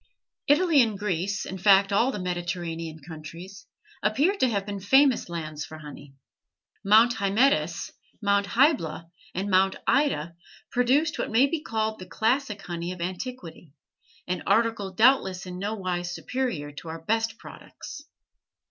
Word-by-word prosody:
Italy 300 0 +5
and 220 -4 0
Greece, 195 0 -2
in 190 - -6
fact 195 +1 +5
all 235 +6 +3
the 245 - -5
Mediterranean 175 -3 -4
countries, 170 +5 -10 0.3
appear 275 - +2
to 260 - +2
have 200 -3 -1
been 200 -1 -5
famous 265 +3 +3
lands 155 -3 -5
for 155 - -9
honey. 145 -2 -11 0.7
Mount 225 +4 +5
Hymettus, 200 - +1 0.3
Mount 200 -1 +1
Hybla, 200 - +1 0.2
and 190 +3 -2
Mount 190 +1 +3
Ida 235 - +1 0.4
produced 270 +6 +2
what - - -2
may 235 +5 +4
be 300 +2 -2
called 220 -4 -2
the 185 - -9
classic 220 0 -1
honey 175 -1 -4
of 180 - -8
antiquity, 180 - -6 0.5
an 180 0 -2
article 220 -1 +1
doubtless 190 -4 +3
in 180 0 -7
nowise 185 -4 -3
superior 240 - -3
to 145 +3 -10
our 160 0 -7
best 225 0 0
products. 295 +3 -11
200 Hz, 140 wpm, -26 LUFS, 175-235 Hz, 0.7 s, Italy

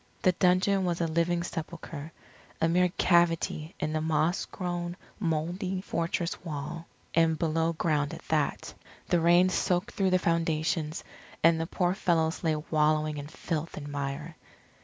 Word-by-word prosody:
The 185 - +6
dungeon 185 +2 +3
was 175 -2 0
a 170 - +1
living 170 +1 +1
sepulchre, 165 -2 -6 0.5
a 165 - +3
mere 180 +2 +3
cavity 170 -2 +2
in 155 - -1
the 155 - 0
moss 160 +2 +1
grown 175 -1 -4 0.2
mouldy 180 +2 -1
fortress 170 -2 -2
wall, 160 +1 -5 0.3
and 165 -1 +3
below 165 +1 +1
ground 150 -3 0
at - - -13
that. - - 0 0.4
The 175 - +4
rain 175 +2 +5
soaked 180 0 0
through 195 -1 +1
the 185 - +4
foundations 165 -2 0 0.4
and 165 0 +5
the 165 - -2
poor 180 0 +1
fellows 165 -3 +1
lay 160 -2 +2
wallowing 155 0 +1
in 145 - -6
filth 160 +1 -4
and 145 -1 -6
mire. 145 +3 -4
165 Hz, 150 wpm, -29 LUFS, 155-175 Hz, 0.5 s, The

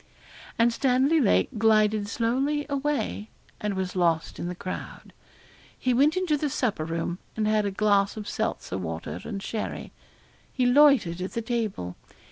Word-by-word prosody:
And 235 0 +3
Stanley 265 +6 +3
Lake 215 - +3
glided 215 -1 +3
slowly 265 +7 0
away, 275 - -2 0.3
and 210 -1 -2
was 190 -1 -3
lost 170 -3 0
in 175 - -3
the 180 - -4
crowd. 185 +1 -7 0.6
He 255 - +1
went 290 +7 +3
into 355 -5 +1
the 295 0 -1
supper 215 - -1
room, 165 +2 -3 0.2
and 215 -1 0
had 215 -1 +2
a - - +1
glass 200 0 +2
of 210 -1 -6
seltzer 205 - -3
water 80 0 -5
and 195 -1 -5
sherry. 220 - -4 0.6
He 255 - 0
loitered 245 - +5
at 185 - -4
the 230 - -2
table. 215 - -3
215 Hz, 155 wpm, -26 LUFS, 185-255 Hz, 0.6 s, loitered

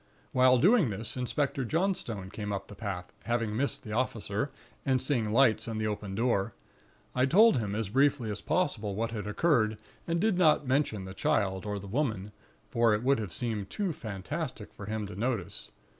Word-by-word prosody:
While 130 0 +5
doing 185 - +5
this, 110 +2 -5
Inspector 135 +2 -1
Johnstone 120 - -1
came 105 -1 -4
up 100 -1 -4
the - - -9
path, 95 -4 -5
having 115 -2 0
missed 140 +3 -1
the 110 - -7
officer, 110 0 -1 0.3
and 130 -1 +2
seeing 120 -6 0
lights 115 -3 +4
and 110 -1 -3
the 110 - -1
open 105 -2 -3
door. 110 -3 +1 0.6
I 130 +1 +3
told 210 - +6
him 105 -2 -2
as 110 -2 -2
briefly 135 -1 +2
as 105 - -5
possible 130 - 0
what 115 +2 -1
had 105 -3 -4
occurred, 110 -2 +2 0.3
and 170 0 +1
did 205 -1 +2
not 155 -4 +4
mention 130 -7 0
the 95 - -7
Child 95 0 0
or 105 0 -2
the 100 - -8
Woman; 105 -3 -1 0.4
for 115 -3 +3
it 105 - -3
would 135 -1 +3
have 105 -5 -4
seem 110 -1 -2
too 195 -5 -2
fantastic 120 - -5
for 105 - -9
him 110 0 -2
to 100 - -8
notice. 110 -4 -3
115 Hz, 190 wpm, -30 LUFS, 105-135 Hz, 0.6 s, told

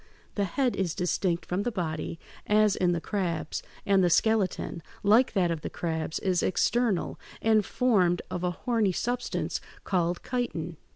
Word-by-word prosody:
The 200 - 0
head 255 +6 0
is 180 -4 -1
distinct 180 -1 0
from 180 +2 -1
the 245 - -1
body, 165 -5 -3 0.3
as 210 -1 +4
in 180 -1 +2
the 170 - 0
crabs, 170 -4 -2 0.2
and 195 -2 +4
the 175 - +4
skeleton, 195 -3 +1 0.2
like 220 +5 +5
that 180 -4 +2
of 165 -2 -3
the - - -4
crabs, 160 -2 -3
is 185 -2 +1
external, 220 0 +1 0.2
and 220 -1 +3
formed 190 -7 +2
of 180 - -3
a 180 - +2
horny 210 +2 0
substance 245 +6 -2 0.2
called 175 -2 0
chitin. 175 -10 -2
185 Hz, 160 wpm, -28 LUFS, 175-215 Hz, 0.3 s, like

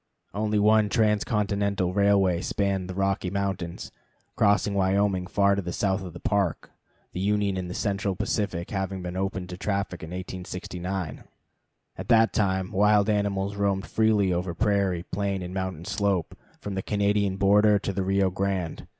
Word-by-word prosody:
Only 105 +1 0
one 105 0 +4
trans 105 -2 +2
continental 100 -3 0
railway 100 -3 +3
spanned 95 -2 -1
the 90 - -5
Rocky 95 -1 0
Mountains, 95 -3 -3 0.4
crossing 100 0 +3
Wyoming 95 -1 +1
far 100 0 +3
to 100 - 0
the 90 -1 -5
south 95 +1 0
of 90 -3 -8
the - - -9
Park, 100 -5 -1 0.4
the - - -4
Union 100 0 +1
and 90 -1 -4
Central 100 -2 -1
Pacific 95 -3 -2
having 95 -1 -3
been 90 0 -5
opened 95 -1 -3
to 90 0 -7
traffic 100 -3 -2
in 80 - -7
1869. 90 -1 -5 0.7
At - - -6
that 115 -2 +4
time, 95 -3 0
wild 105 +1 +4
animals 100 -1 -1
roamed 100 -1 0
freely 105 -4 +2
over 90 0 -2
prairie, 100 -4 +1
plain, 100 0 -2
and 90 +1 -6
mountain 95 -3 -4
slope, 100 -5 -1 0.2
from 100 - -5
the 95 - -2
Canadian 100 -1 0
border 105 +2 +5
to 100 -1 -3
the 95 - -1
Rio 95 0 +1
Grande. 95 -3 -2
100 Hz, 160 wpm, -26 LUFS, 95-100 Hz, 0.7 s, border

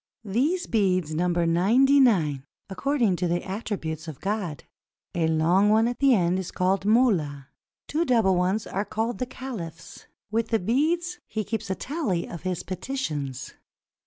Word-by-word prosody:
These 275 - 0
beads 185 -8 +1
number 175 +1 +1
ninety 230 +12 +4
nine, 160 - +3 0.3
according 230 -2 +1
to 180 - 0
the 175 +1 -1
attributes 185 -6 -4
of 155 -4 -7
God. 195 - -3 0.5
A 165 -2 +1
long 170 +6 +3
one 220 +2 +4
at 245 0 -3
the 275 -3 +5
end 180 -1 +1
is 185 - -4
called 185 +1 +1
the 200 - -5
molla; 170 - +2 0.4
two 315 +3 0
double 225 - +3
ones 185 +4 0
are 195 - -2
called 220 0 -3
the 255 - -2
caliphs. 185 -13 -8 0.2
With 225 +1 0
the 225 - +2
beads 330 - 0
he 220 - -3
keeps 220 0 -4
tally 265 - -2
of 170 - -8
his 180 0 -3
peti 185 +10 -5
tions. 140 - -4
195 Hz, 160 wpm, -26 LUFS, 170-240 Hz, 0.5 s, the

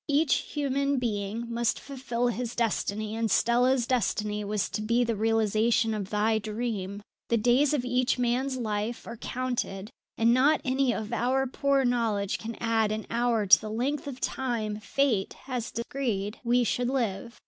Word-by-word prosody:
Each 290 0 +3
human 280 -1 -1
being 220 -1 -2
must 235 -1 0
fulfil 245 -3 -2
his 240 0 -3
destiny, 215 -2 -1
and 225 0 0
Stella's 245 +4 +3
destiny 210 -3 0
was 205 -1 -1
to 215 - -3
be 235 +3 +2
the 230 -1 -1
realization 225 +1 +2
of 200 -3 -4
thy 220 +1 +1
dream. 210 -2 -4 0.3
"The 235 - +3
days 245 +5 +3
of 280 -5 0
each 250 +1 +1
man's 250 +2 0
life 220 0 -3
are 235 - -7
counted, 240 -5 -3 0.3
and 230 +1 +4
not 280 +5 +4
any 260 0 +2
of 220 0 -4
our 255 +3 +1
poor 275 +1 +1
knowledge 225 -5 0
can 230 0 -6
add 225 -2 +1
an 215 0 -3
hour 235 -2 +1
to 190 - +7
the 215 - -6
length 275 +7 -2
of 265 -2 -6
time 230 -6 -2
Fate 220 -2 0
has 250 -3 -3
decreed 230 -5 -3
we 245 +1 +3
should 245 +2 0
live. 235 -3 -2
235 Hz, 165 wpm, -28 LUFS, 215-255 Hz, 0.3 s, to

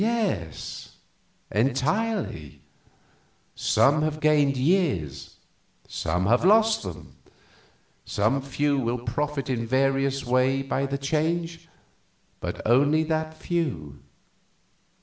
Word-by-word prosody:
"Yes, 205 - -2 0.6
entirely. 135 - -1 0.9
Some 145 +3 +3
have 155 0 -1
gained 150 -3 +3
years, 125 - 0 0.5
some 90 +3 -1
have 120 +7 +3
lost 220 +3 +4
them. 90 -6 -9 0.9
Some 110 +7 0
few 140 +1 0
will 120 -1 -1
profit 140 +4 -3
in 120 -3 -2
various 135 +1 +1
ways 130 +2 +2
by 135 0 0
the 140 0 -2
change, 165 +4 -2 0.7
but - - -5
only 145 +7 +4
that 160 0 -2
few." 125 - -3
140 Hz, 95 wpm, -25 LUFS, 120-155 Hz, 0.9 s, lost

